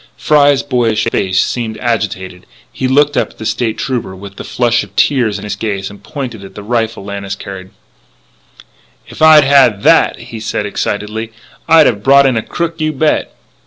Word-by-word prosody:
Fry's 145 -2 +3
boyish 120 -5 0
face 95 0 0
seemed 115 -1 -2
agitated; 95 -6 -3 0.3
he 130 - -2
looked 145 +3 +2
up - - 0
at - - -21
the 110 - -8
State 110 0 -1
Trooper 125 -7 -3
with 100 +1 -11
the - - -7
flush 120 -1 0
of 100 -1 -15
tears 120 -7 +1
in 100 - -9
his 105 - -4
gaze 100 -3 -4
and 100 - -14
pointed 120 -8 -7
at 95 - -12
the 105 - -8
rifle 110 -2 -2
Lannis 100 -1 -5
carried: 95 -2 -9 1.4
"If - - -12
I'd 155 -1 +8
had 135 -7 +4
that," - - +4
he 115 - -9
said 105 -1 -3
excitedly, 105 +2 -3 0.4
"I'd 160 -1 +6
have 105 -5 +1
brought 140 +3 +5
in 130 -2 +2
a 115 - 0
crook, 165 +6 -4
you 155 0 0
bet!" 155 +1 0
115 Hz, 185 wpm, -14 LUFS, 100-135 Hz, 1.4 s, I'd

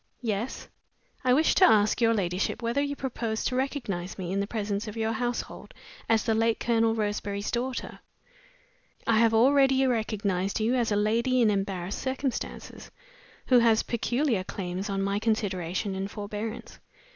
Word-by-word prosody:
"Yes?" 220 +2 -3 0.6
"I 255 - +3
wish 305 +5 +4
to - - +4
ask 215 - +5
your 230 0 +4
ladyship 185 +2 -1
whether 235 +5 +1
you 285 0 -2
propose 230 -5 -3
to 250 - 0
recognize 235 -10 -3
me 180 -2 -4
in 195 - 0
the 200 - -1
presence 210 -1 -3
of 215 +1 -7
your 220 0 0
household 245 +2 -4 0.3
as 225 -1 +3
the 225 - +1
late 225 0 +1
Colonel 225 -1 +2
Roseberry's 205 -1 -2
daughter?" 250 +1 -3 1.1
"I 225 -2 +3
have 225 -1 +4
already 270 +2 +4
recognized 205 -5 -1
you 220 +3 +1
as 240 -3 +1
a - - +2
lady 230 +5 +2
in 225 -3 +4
embarrassed 195 -2 -2
circumstances, 265 0 -4 0.6
who 250 -2 +5
has 230 -2 +4
peculiar 240 -2 0
claims 185 +1 -5
on 195 0 -1
my 200 +1 0
consideration 195 -3 -1
and 190 +1 -3
forbearance. 210 +2 -6
220 Hz, 155 wpm, -27 LUFS, 200-240 Hz, 1.1 s, ask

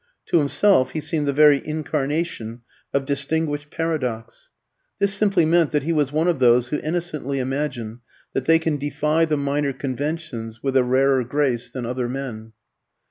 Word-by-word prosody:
To 170 - +4
himself 145 -2 +3
he 155 - -2
seemed 150 -1 -2
the - - +3
very 145 0 +5
incarnation 150 -5 -3 0.3
of 140 0 0
distinguished 145 +1 -2
paradox. 130 -10 -3 0.5
This 200 0 +2
simply 200 -4 +2
meant 165 0 +3
that 150 -3 0
he 165 +3 0
was 145 -3 +1
one 155 +3 +1
of 175 -5 +1
those 125 0 +4
who 150 - -1
innocently 155 -4 -3
imagine 130 -4 -3 0.3
that 135 - -2
they 165 0 +5
can 160 -2 -1
defy 150 +3 +1
the 155 -2 0
minor 140 0 -1
conventions 130 -4 -4
with 135 -1 -1
a 130 - +5
rarer 130 +1 +3
grace 125 -2 -1
than 130 -2 -5
other 125 0 -2
men. 120 -4 -6
145 Hz, 165 wpm, -22 LUFS, 130-155 Hz, 0.5 s, very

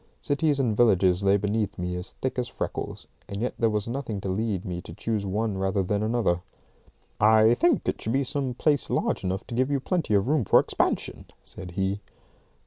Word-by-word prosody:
Cities 145 0 +1
and 120 -6 +1
villages 95 -5 +4
lay 100 0 +4
beneath 105 +1 -1
me 90 0 -3
as 90 +1 -6
thick 130 -1 -3
as 125 - -1
freckles, - - -5 0.2
and 100 - -4
yet 125 +3 -1
there 115 - +3
was 105 -1 -1
nothing 120 -4 -3
to 95 - -3
lead 100 -1 -1
me 90 -1 -4
to - - -11
choose 110 -3 -2
one 105 0 -1
rather 95 0 +1
than 100 +3 -1
another. 110 -6 +1 0.8
"I 110 +1 +6
think 175 +8 +2
it - - -1
should 110 - -2
be 135 +1 +2
some 135 -2 -2
place 145 +1 +1
large - - 0
enough 95 +1 -2
to - - -8
give 130 +3 +1
you 140 -1 +1
plenty 160 - 0
of 100 +2 +2
room 150 -2 +2
for - - +5
expansion," - - -1 0.2
said 90 -3 -9
he. 95 +1 0
110 Hz, 205 wpm, -26 LUFS, 95-125 Hz, 0.8 s, I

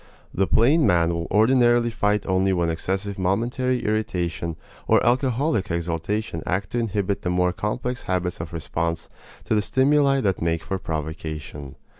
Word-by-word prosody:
The 95 0 +1
plain 145 +7 +4
man 85 -1 +3
will 85 0 -3
ordinarily 120 +2 +4
fight 105 -2 0
only 95 0 +2
when 85 -2 +1
excessive 95 +4 -3
momentary 120 +7 0
irritation 90 -6 -1 0.3
or - - +4
alcoholic 125 -2 +1
exaltation 85 +2 -2
act 95 +2 -2
to 120 - 0
inhibit 100 -3 -1
the 90 - -2
more 90 0 +1
complex 120 +6 -3
habits 90 -2 -1
of 80 - -7
response 85 0 -3 0.3
to - - -1
the 105 - +3
stimuli 135 +4 +3
that 95 -5 0
make 85 -1 0
for 95 - -3
provocation. 80 -3 -5
95 Hz, 150 wpm, -23 LUFS, 85-115 Hz, 0.3 s, plain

